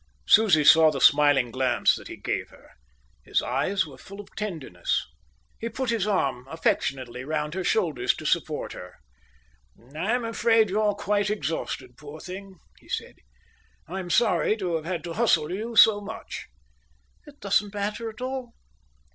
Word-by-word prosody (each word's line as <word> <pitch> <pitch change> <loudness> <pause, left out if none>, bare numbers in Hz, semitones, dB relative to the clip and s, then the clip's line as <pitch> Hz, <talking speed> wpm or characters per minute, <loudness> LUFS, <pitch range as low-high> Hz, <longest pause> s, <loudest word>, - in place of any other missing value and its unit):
Susie 195 -9 +5
saw 160 +2 +7
the 145 -3 -3
smiling 145 -4 +5
glance 130 0 +2
that - - -10
he - - -8
gave - - -3
her. - - -19 0.5
His - - 0
eyes 165 +10 0
were - - -13
full 200 +1 -12
of 205 0 -12
tenderness. 160 - -3 0.5
He 230 - -3
put 245 +2 -2
his 220 -3 0
arm 135 -11 0
affectionately 130 -6 -1
round 150 +1 -2
her 190 +1 -3
shoulders 155 - +1
to 155 - -9
support 155 -2 -1
her. 90 0 -10 1.0
"I'm 225 +9 0
afraid 225 -2 +2
you're 210 0 +1
quite 205 0 0
exhausted, 140 - -4
poor 150 +1 -10
thing," 190 +2 -9 0.2
he - - -22
said. - - -4 0.7
"I'm 185 +1 -5
sorry 220 +1 +2
to 185 -5 -3
have 160 -1 -2
had 170 -2 -3
to 170 -1 -5
hustle 170 -8 +2
you 220 +5 -4
so 215 -1 +7
much." 220 +2 -8 0.8
"It 290 0 -15
doesn't 205 +1 0
matter 210 +3 -3
at 220 +2 -12
all." 255 -2 -4
190 Hz, 155 wpm, -26 LUFS, 150-215 Hz, 1.0 s, saw